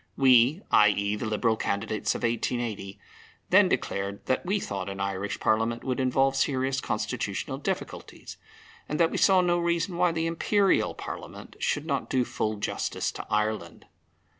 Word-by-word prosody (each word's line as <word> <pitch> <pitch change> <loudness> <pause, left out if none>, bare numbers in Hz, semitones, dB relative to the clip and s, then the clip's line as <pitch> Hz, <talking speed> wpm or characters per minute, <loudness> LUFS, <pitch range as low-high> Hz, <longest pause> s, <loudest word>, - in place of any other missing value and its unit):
We 130 - +5
(i.e. 105 -1 +4
the 110 +2 -4
Liberal 110 +1 +1
candidates 105 0 -2
of - - -5
1880) 115 -4 -2 0.5
then - - +6
declared 100 0 -2
that 130 - 0
we 195 +3 0
thought 100 - -4
an 100 0 -6
Irish 100 +1 -3
Parliament 115 +2 +1
would 130 -1 -2
involve 135 +1 +2
serious 135 -1 0
constitutional - - -3
difficulties, - - -5 0.5
and 150 - -2
that 165 -1 +4
we - - -2
saw 190 -2 +5
no 175 -1 +2
reason 170 +1 -1
why 175 0 +3
the 165 0 -1
Imperial 195 +4 +2
Parliament - - -8
should 145 - -1
not 140 -4 -2
do 130 -2 +1
full 110 -2 -2
justice 105 - -2
to - - -8
Ireland. 105 -5 -2
125 Hz, 155 wpm, -27 LUFS, 105-160 Hz, 0.5 s, then